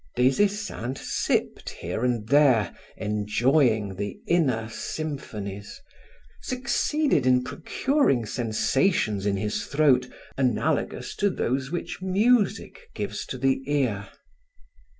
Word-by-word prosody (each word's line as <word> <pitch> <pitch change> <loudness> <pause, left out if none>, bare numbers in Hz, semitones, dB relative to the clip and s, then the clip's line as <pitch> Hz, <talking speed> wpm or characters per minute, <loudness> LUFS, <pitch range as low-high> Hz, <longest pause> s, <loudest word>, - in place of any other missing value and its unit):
Des 130 +2 +3
Esseintes 200 - -2
sipped - - 0
here 90 +7 -5
and 120 -4 0
there, 130 -9 +4 0.2
enjoying 105 0 +1
the 100 0 -4
inner 130 -10 +1
symphonies, 110 -7 -6 0.6
succeeded 255 - 0
in 125 0 +4
procuring 265 - 0
sensations 110 - 0
in 100 -1 +1
his 105 +1 -2
throat 135 -4 +3 0.3
analogous 125 -5 0
to 205 - +2
those 135 -6 -1
which 175 +2 -5
music 225 - +1
gives - - -4
to - - -5
the 135 -1 +1
ear. 125 -9 0
130 Hz, 105 wpm, -26 LUFS, 110-160 Hz, 0.6 s, there